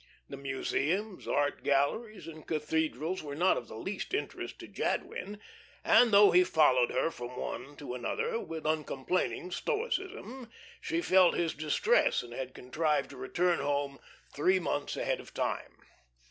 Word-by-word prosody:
The - - -6
museums, 160 +8 -2
art 145 0 0
galleries, 190 +11 0
and 155 -1 -10
cathedrals 160 +2 -1
were 145 -2 -6
not 180 +5 +3
of 120 - -5
the 110 - -9
least 195 - -4
interest 420 - -4
to - - -10
Jadwin, 205 +1 -3 0.4
and 240 -2 +6
though 205 0 +8
he 180 +1 +6
followed 140 -8 +4
her 165 - 0
from 120 -2 -8
one 135 +5 -5
to 145 -4 -7
another 460 - -2
with 160 - -6
uncomplaining 155 +4 -1
stoicism, 375 - -3 0.3
she 335 +1 -1
felt 185 - +5
his 170 -2 0
distress, 155 - +2
and 120 -1 -10
had 130 +1 -5
contrived 150 +5 0
to - - -10
return 175 +5 +1
home 140 -1 -1 0.3
three 185 +6 +3
months 145 -4 -2
ahead - - -1
of - - -13
time. - - -2
160 Hz, 150 wpm, -31 LUFS, 140-200 Hz, 0.4 s, though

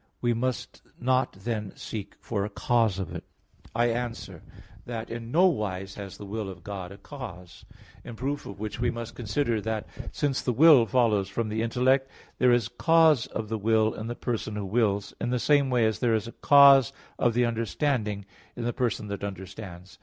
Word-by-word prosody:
We 120 -1 +1
must 125 +2 -3 0.2
not 130 +1 +1
then 105 0 -4
seek 105 -3 -7
for 100 -4 -2
a 105 - -3
cause 115 -5 +1
of 95 - -4
it. - - -6 0.5
I 120 +1 +3
answer 120 0 -5 0.5
that, 115 -2 -5
In 115 0 -6
no 175 +6 +5
wise 95 - -1
has 100 -2 -8
the 105 - -9
will 105 0 -4
of 90 -3 -10
God 95 -2 -6
a 100 - -10
cause. 90 - -10 0.4
In 120 - -8
proof 140 +5 -3
of 100 - -9
which 110 +2 -5
we 120 0 +1
must 115 -1 -5
consider 115 0 -1
that, 110 0 -3 0.3
since 145 -3 -1
the 125 - -1
will 140 -3 +7
follows 110 -6 +2
from 110 +2 -2
the 110 +1 -1
intellect, 130 +3 +2 0.3
there 125 -1 +5
is 120 -3 +3
cause 160 -6 +4
of 110 -1 -5
the 110 -1 -2
will 110 +1 +2
in 110 - -6
the 120 - -4
person 115 -4 -3
who 105 -1 -3
wills, 100 -1 0
in - - -1
the 125 - +1
same 140 +2 +3
way 125 -3 +3
as 110 -3 0
there 115 -2 +2
is 110 - -1
a - - -7
cause 140 -2 +7 0.3
of 120 -2 +2
the 125 0 +3
understanding, 115 -2 -1 0.3
in 120 - -5
the 120 0 -1
person 115 -5 -1
that 100 0 -5
understands. 95 -2 -8
115 Hz, 200 wpm, -27 LUFS, 105-125 Hz, 0.5 s, will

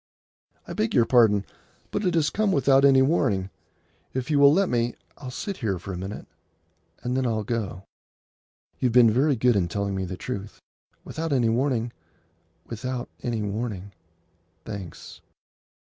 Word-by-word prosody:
"I - - -5
beg 110 - -1
your 120 - +5
pardon, 110 -5 +4 0.5
but 205 - -2
it 180 -2 +1
has 155 -2 +2
come 215 -1 +1
without 135 -3 +4
any 135 -1 +6
warning. 100 - +1 0.6
If 130 +3 -2
you 145 - +3
will 140 0 +8
let 190 +5 +3
me, 120 0 0 0.2
I'll 130 -3 -7
sit 195 +9 -5
here 100 -5 -1
for 95 +2 -7
a - - -4
minute, 95 +3 -6 0.8
and 125 +1 -1
then 130 -1 +1
I'll 110 -2 -1
go. 105 -4 -3 1.0
You 130 - +2
have 120 - -1
been 120 -2 +7
very 135 +5 +3
good 120 0 +3
in 90 -4 +2
telling 100 +3 -2
me 95 -1 -2
the 90 0 -6
truth. 105 -3 -6 0.4
Without 165 0 -4
any 125 -5 +3
warning; 120 -1 0 0.7
without 125 +2 -4
any 115 -3 -2
warning. 100 -2 -4 0.7
Thanks." 100 -6 -8
120 Hz, 160 wpm, -25 LUFS, 100-135 Hz, 1.0 s, will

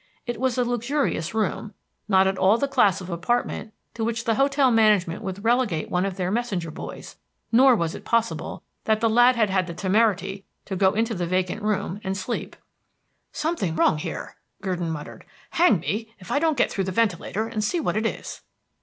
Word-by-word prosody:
It 240 -2 -4
was 260 -2 +1
a 250 - +3
luxurious 240 - -1
room; 215 0 -2 0.3
not 190 -2 +4
at 190 0 0
all 190 +4 +5
the 280 - 0
class 205 -8 +3
of 185 - -8
apartment 215 +5 -1 0.2
to 225 - -4
which 230 0 -1
the 230 -2 +1
hotel 275 +2 +3
management 210 -7 +3
would 190 +1 -5
relegate 230 -9 +1
one 180 +2 +1
of 190 -1 -5
their 185 -1 -1
messenger 200 -8 -2
boys, - - -9 0.3
nor 255 +2 +6
was 170 -5 -1
it - - -8
possible 230 0 -1 0.2
that 220 -1 +2
the 230 - +2
lad 240 +3 +5
had 215 -4 +2
had 185 -2 +1
the 170 - -6
temerity 195 0 +1 0.2
to 195 - -4
go 190 +1 +3
into 225 +1 +1
the 175 -4 -2
vacant 185 +4 -1
room 205 -1 -2
and 190 0 -2
sleep. 220 +5 -4 0.8
"Something 300 - -2
wrong 155 -1 +3
here," - - -6 0.2
Gurdon 180 -4 -2
muttered. 150 -2 -7 0.3
"Hang 335 - +4
me 220 +6 -4
if 185 - -11
I 285 - +2
don't 315 -2 +1
get - - +2
through 195 - -1
the 190 - -2
ventilator 215 +1 0
and 220 -2 -3
see 345 - 0
what 305 - -1
it 220 +1 +1
is." - - -6
215 Hz, 200 wpm, -24 LUFS, 185-235 Hz, 0.8 s, nor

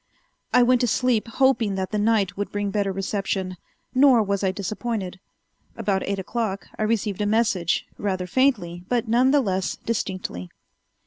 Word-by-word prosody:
I 250 - +6
went 250 0 +4
to 245 - +2
sleep 235 -1 +1
hoping 230 -4 +2
that 190 -1 -3
the 210 - 0
night 205 -4 +2
would 205 0 -4
bring 205 -1 -2
better 200 -1 0
reception, 195 -1 -2 0.4
nor 255 -3 +6
was 200 -1 -1
I 190 - +2
disappointed. 200 -1 -4 0.6
About 195 -1 0
eight 200 0 -1
o'clock 200 +1 -3
I - - -7
received 215 -2 0
a 205 - +1
message, 210 -6 +1
rather 185 -3 -1
faintly, 180 -7 +1
but 240 -2 0
none 245 +4 +4
the 285 +1 +4
less 190 -5 -1
distinctly. 185 - -4
205 Hz, 165 wpm, -24 LUFS, 190-230 Hz, 0.6 s, I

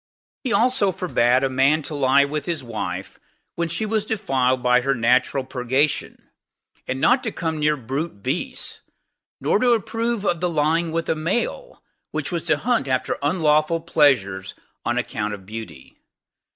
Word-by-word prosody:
He 255 - -1
also 235 -4 +3
forbade 130 -8 +2
a - - +3
man 135 +4 +2
to 155 - -5
lie 140 0 +4
with 145 0 -4
his 165 -5 -2
wife 115 -3 -5 0.3
when 170 -1 -2
she 170 +7 -1
was 215 -1 0
defiled 130 - 0
by 125 0 +4
her 135 +2 +1
natural 125 +3 +2
purgation: 130 +3 -1 0.6
and 130 - -2
not 250 - +4
to 225 - -3
come 160 -4 -3
near 150 0 +2
brute 130 -2 -4
beasts; 140 +7 -3 0.6
nor - - +2
to 245 -1 +4
approve 230 0 -1
of 175 -3 +1
the 180 +1 0
lying 160 +1 +1
with 165 0 -2
a - - +2
male, 235 - -3 0.3
which - - -4
was - - -3
to - - +3
hunt 240 - 0
after 130 -1 -1
unlawful 155 +1 +2
pleasures 115 - +1 0.3
on 120 +1 -1
account 105 -4 -2
of 95 -2 -15
beauty. 105 -10 -9
150 Hz, 165 wpm, -22 LUFS, 125-170 Hz, 0.6 s, lie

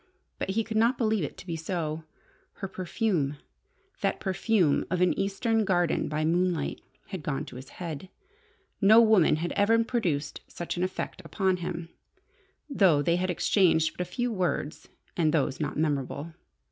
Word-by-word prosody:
But - - -3
he 220 +4 +1
could 220 0 -3
not 235 +3 +3
believe 220 -5 +1
it 145 - -5
to - - -11
be 170 -3 -3
so. 160 -1 -3 0.5
Her 195 - -6
perfume 185 - -1 0.6
that - - 0
perfume 190 -4 +2
of 180 - 0
an 180 0 +4
Eastern 220 +3 0
garden 175 -4 +1
by 155 +1 -1
moonlight 175 -2 0 0.3
had 190 -4 -5
gone 145 -2 -2
to - - -11
his 130 +2 -9
head. 170 0 -6 0.7
No 215 +3 +8
woman 215 -9 +5
had 170 +3 -3
ever 225 +3 +3
produced 170 - -2
such 175 - -5
an 175 - -3
effect 185 +1 -3
upon 190 -3 0
him, 170 -1 -5 0.8
though 190 - +4
they 170 +3 +2
had 185 +1 -1
exchanged 170 -2 +2
but - - -4
a 180 - -4
few 245 +4 -1
words, 170 -6 -2 0.3
and 160 -3 +2
those 140 -4 0
not 150 - -2
memorable. 150 +1 -2
180 Hz, 165 wpm, -28 LUFS, 155-200 Hz, 0.8 s, No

